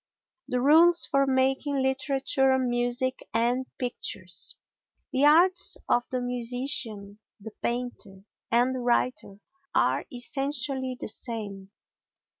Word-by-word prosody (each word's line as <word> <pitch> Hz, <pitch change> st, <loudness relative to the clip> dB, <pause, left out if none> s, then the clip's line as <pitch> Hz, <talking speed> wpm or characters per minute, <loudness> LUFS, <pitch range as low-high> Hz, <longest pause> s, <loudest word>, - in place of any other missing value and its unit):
The 250 Hz, -, -1 dB
Rules 330 Hz, +6 st, +5 dB
for 275 Hz, 0 st, +1 dB
Making 265 Hz, +1 st, +1 dB
Literature, 270 Hz, 0 st, +2 dB
Music 245 Hz, 0 st, -1 dB, 0.2 s
and 245 Hz, +3 st, +1 dB
Pictures 185 Hz, -8 st, -4 dB, 0.6 s
The 270 Hz, +2 st, +3 dB
arts 345 Hz, +5 st, +5 dB
of 240 Hz, -, +3 dB
the 255 Hz, -1 st, -2 dB
musician, 245 Hz, -4 st, -2 dB, 0.2 s
the 220 Hz, +2 st, -9 dB
painter 235 Hz, -5 st, -4 dB, 0.3 s
and 245 Hz, +3 st, +2 dB
the 260 Hz, -, -3 dB
writer 240 Hz, -4 st, -1 dB, 0.4 s
are 130 Hz, +2 st, +1 dB
essentially 270 Hz, 0 st, -2 dB
the -, -, -5 dB
same. 205 Hz, -3 st, -5 dB
250 Hz, 105 wpm, -27 LUFS, 235-270 Hz, 0.6 s, Rules